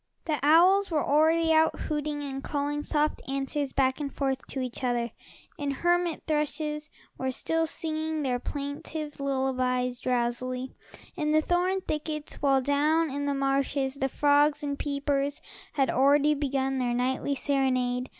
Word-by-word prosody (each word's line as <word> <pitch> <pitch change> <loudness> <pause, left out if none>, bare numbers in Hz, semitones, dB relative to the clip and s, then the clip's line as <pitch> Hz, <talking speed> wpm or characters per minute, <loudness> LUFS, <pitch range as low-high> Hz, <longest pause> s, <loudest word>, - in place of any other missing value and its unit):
The 305 -3 -1
owls 360 +7 +5
were 310 -4 0
already 320 +2 +3
out, 320 0 +3
hooting 295 -1 -2
and 270 -1 -5
calling 290 0 -2
soft 300 0 0
answers 275 +1 -2
back 265 0 +1
and 285 -2 -3
forth 270 -1 -1
to 270 - -5
each 255 0 -4
other, 240 -2 0 0.5
and 285 -1 -1
hermit 345 +2 0
thrushes 300 0 -2 0.3
were 260 - -1
still 325 +5 0
singing 315 -1 -2
their 250 -2 0
plaintive 285 +3 -5
lullabies 255 -2 0
drowsily, 250 +1 -2 0.4
in 305 -3 0
the 310 - +5
thorn 365 +3 +1
thickets, 305 -2 -4
while 275 -2 +3
down 300 +3 +2
in 285 +1 -2
the 280 - 0
marshes 275 0 0
the 270 -1 -2
frogs 290 +2 +3
and 285 -1 -3
peepers 280 -1 -1 0.3
had 270 -2 +2
already 285 +3 +4
begun 270 -2 -1
their 245 -1 0
nightly 260 +3 0
serenade. 255 -2 0
285 Hz, 150 wpm, -28 LUFS, 265-305 Hz, 0.5 s, owls